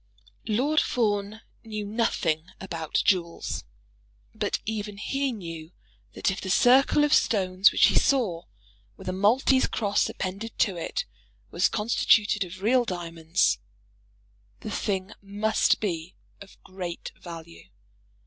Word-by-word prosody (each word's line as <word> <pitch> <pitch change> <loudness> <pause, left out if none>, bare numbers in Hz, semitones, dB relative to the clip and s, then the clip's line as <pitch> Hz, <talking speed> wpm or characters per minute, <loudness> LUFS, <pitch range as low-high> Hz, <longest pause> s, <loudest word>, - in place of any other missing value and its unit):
Lord 275 +8 +2
Fawn 210 -2 -1 0.2
knew 215 -2 -5
nothing 185 -7 0
about 165 -4 -2
jewels, 170 -3 0 0.7
but - - -1
even 210 -1 -4
he 270 +6 -1
knew 165 -6 -8 0.4
that - - 0
if 190 - -5
the 190 - -5
circle 265 +8 +5
of 295 0 +3
stones 190 -2 +4
which - - +5
he - - +3
saw, 210 -12 +2 0.5
with 190 - -12
a 185 - -1
Maltese 245 +7 +3
cross 205 -3 0
appended 195 +4 -5
to 195 -4 +2
it, 170 - -3 0.5
was 175 - +2
constituted 210 -1 +2
of 185 +1 -10
real 245 +3 +4
diamonds, 165 - 0 1.0
the - - -6
thing 190 0 -2
must 205 +2 +1
be 170 -4 -3 0.3
of 200 - -13
great 180 -2 -6
value. 165 - -10
200 Hz, 125 wpm, -26 LUFS, 175-220 Hz, 1.0 s, circle